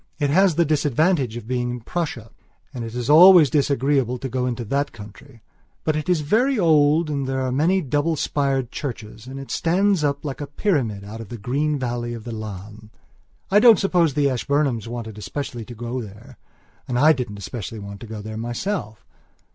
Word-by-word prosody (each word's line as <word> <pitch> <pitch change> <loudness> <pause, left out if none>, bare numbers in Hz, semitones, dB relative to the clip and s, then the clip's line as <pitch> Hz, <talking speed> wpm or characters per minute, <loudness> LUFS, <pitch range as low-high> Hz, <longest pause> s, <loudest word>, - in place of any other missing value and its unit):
It 145 -2 0
has 190 +1 +4
the 170 - +3
disadvantage 145 -3 +1
of 120 - -8
being 125 -1 -1
in 120 0 -4
Prussia; 125 -6 -4 0.4
and 125 -3 -5
it 115 +1 -7
is 125 -1 -3
always 165 -1 +8
disagreeable 135 -3 +1
to 135 +2 -5
go 125 0 -1
into 120 -1 -3
that 140 +6 -1
country; 110 +2 -13 0.4
but 155 - 0
it 155 +2 -3
is 175 -4 +2
very 235 - +2
old 155 -2 +4
and 140 -3 -2
there 130 0 -1
are 130 -1 -1
many 165 +8 +2
double 145 +4 0
spired 135 -4 -1
churches 115 -4 -7
and 135 +1 -7
it 135 - -9
stands 185 +1 +1
up 145 0 -1
like 140 0 -5
a 145 - -4
pyramid 135 - -1
out 110 +3 -8
of 110 - -10
the 120 - -6
green 140 +7 -1
valley 120 -2 -3
of 115 - -9
the 120 - -7
Lahn. 105 0 -8 0.6
I 205 - +6
don't 230 0 +7
suppose 175 -7 +2
the 145 -1 +3
Ashburnhams 135 -3 0
wanted 115 -3 -6
especially 120 -1 -5
to 120 - -10
go 120 +2 -4
there 105 -1 -12 0.5
and 125 - -1
I 155 +5 +6
didn't 120 -7 -5
especially 110 +2 -6
want 100 -1 -8
to 115 - -10
go 105 -1 -7
there 110 0 -6
myself. 120 - -4
130 Hz, 195 wpm, -22 LUFS, 115-150 Hz, 0.6 s, always